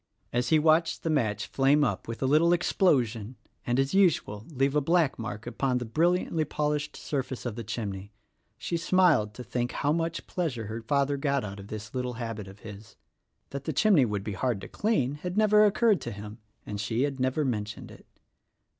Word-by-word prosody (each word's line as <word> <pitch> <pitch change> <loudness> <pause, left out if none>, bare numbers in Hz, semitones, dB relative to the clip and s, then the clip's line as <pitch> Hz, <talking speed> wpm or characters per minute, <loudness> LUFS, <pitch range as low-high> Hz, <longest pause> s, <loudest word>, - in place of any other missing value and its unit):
As 125 +1 0
he 160 - +5
watched 160 +2 +2
the 165 - 0
match 110 -8 0
flame 140 +2 +3
up 130 - -1
with 115 +3 -5
a - - +2
little 155 +5 +4
explosion 125 - +1 0.3
and, 120 +2 +1
as 135 +3 +1
usual, 150 - +2
leave 135 -1 0
a 150 - +4
black 165 -2 +2
mark 110 -1 -5
upon 125 +1 -1
the 125 - -3
brilliantly 165 +6 +1
pol 150 0 -1
ished 150 0 -3
surface 130 -3 -4
of 120 -3 -3
the 115 - -5
chimney, 100 -3 -5 0.5
she 170 +6 -2
smiled 165 - +3
to 125 - -7
think 120 +1 -2
how 145 - 0
much 165 0 -2
pleasure 140 -11 -3
her 110 +2 -5
father 140 +4 +1
got 140 -1 0
out 100 -1 -6
of 100 - -10
this 110 +1 -7
little 125 -1 -2
habit 115 -4 -5
of 95 +2 -13
his. 105 -1 -11 0.6
That 140 0 -6
the 160 - -2
chimney 175 - +4
would 105 -3 -3
be 105 - -4
hard 120 +1 -1
to - - -7
clean 145 - 0
had 180 +2 -4
never 215 0 +6
occurred 210 - +3
to 120 - -5
him, 105 +2 -9 0.3
and 105 -1 -4
she 115 +4 0
had 140 -2 -2
never 130 +4 +1
mentioned 105 -4 -4
it. - - -15
130 Hz, 200 wpm, -28 LUFS, 110-155 Hz, 0.6 s, never